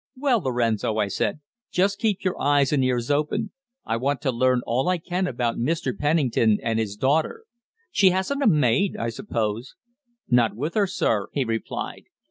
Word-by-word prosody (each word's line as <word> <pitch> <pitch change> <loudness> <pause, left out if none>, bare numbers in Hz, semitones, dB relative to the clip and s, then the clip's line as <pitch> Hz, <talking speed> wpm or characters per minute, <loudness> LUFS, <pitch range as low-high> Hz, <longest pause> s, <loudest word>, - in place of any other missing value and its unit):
"Well, 260 -3 +2
Lorenzo," 115 - 0
I 105 -2 +1
said, 125 +9 -2 0.3
"just 200 +2 +1
keep 215 -4 0
your 185 -1 -2
eyes 145 -1 +3
and 135 -3 +2
ears 125 0 0
open. 155 +9 0 0.3
I 115 - -1
want 140 +3 -1
to 140 -4 0
learn 125 +1 +2
all 130 +8 0
I 185 - +2
can 180 +2 -2
about 120 -4 -1
Mr. 135 0 -1
Pennington 135 -8 +2
and 115 -1 0
his 105 -3 -2
daughter. 155 - 0 0.5
She 195 - +5
hasn't 190 +10 -1
a 275 - +3
maid, 150 - +2
I 115 - -2
suppose?" 115 - -3 0.5
"Not 120 -3 +3
with 150 +8 -3
her, 205 -2 +2
sir," 105 - 0
he 140 - +1
replied. 115 -1 -4
135 Hz, 175 wpm, -24 LUFS, 115-180 Hz, 0.5 s, She